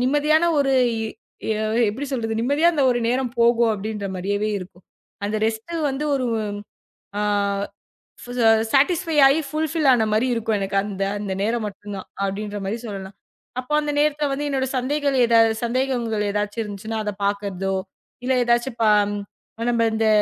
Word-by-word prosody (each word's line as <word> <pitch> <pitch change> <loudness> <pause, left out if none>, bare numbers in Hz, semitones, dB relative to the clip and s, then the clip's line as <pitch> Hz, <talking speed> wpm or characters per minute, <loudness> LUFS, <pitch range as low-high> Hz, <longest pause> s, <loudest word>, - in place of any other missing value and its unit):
நிம்மதியான 300 +4 +3 0.2
ஒரு 270 -1 +2 1.2
எப்படி 275 +7 -5
சொல்றது, 225 -3 -1
நிம்மதியா 285 +7 +3
அந்த 280 -3 +2
ஒரு 240 - -1
நேரம் 250 -1 0
போகும் 235 -1 +4
அப்படின்னு 205 -1 -4
மாதிரியே 205 +3 -1
இருக்கும். 180 0 -12 0.4
அந்த 215 +1 -1
ரெஸ்ட் 225 +8 -4 0.2
வந்து 275 +3 -3
ஒரு 255 -2 -1 0.9
அ - - +1 1.5
சேட்டிஸ்பை 325 +4 +3
ஆயி 280 +4 +3
புல் 310 +1 0
பில் 315 -3 0
ஆன - - +6
பண்ணா - - +2
மாரி 230 +4 +2
இருக்கும். 225 -2 0
எனக்கு 195 0 -3
அந்த 195 -1 -3 0.2
அந்த 200 -2 -3
நேரம் 225 +1 0
மட்டும் 205 +1 -8
தான் 190 - -8 0.2
அப்படின்னு 205 +2 -3
சொல்லலாம். 195 -1 -7 0.4
அப்போ 255 +4 -4
அந்த 295 0 -2
நேரத்தை 300 0 +2
வந்து 290 +2 -2
என்னோட 265 -1 0
சந்தேங்கள் 280 +1 0 0.5
சந்தேகங்கள் 235 -3 0
எதாச்சும் 210 +2 -2
இருந்துச்சுன்னா 215 +2 -5
அத 210 - -2
பாக்குறதோ 200 -1 -1 0.5
இல்ல 260 - +2
ஏதாச்சும் 240 +1 +1
பா 215 - +5 0.8
நம்ம 230 -1 +2
இந்த 220 0 +1
230 Hz, 145 wpm, -22 LUFS, 205-270 Hz, 1.5 s, ஆன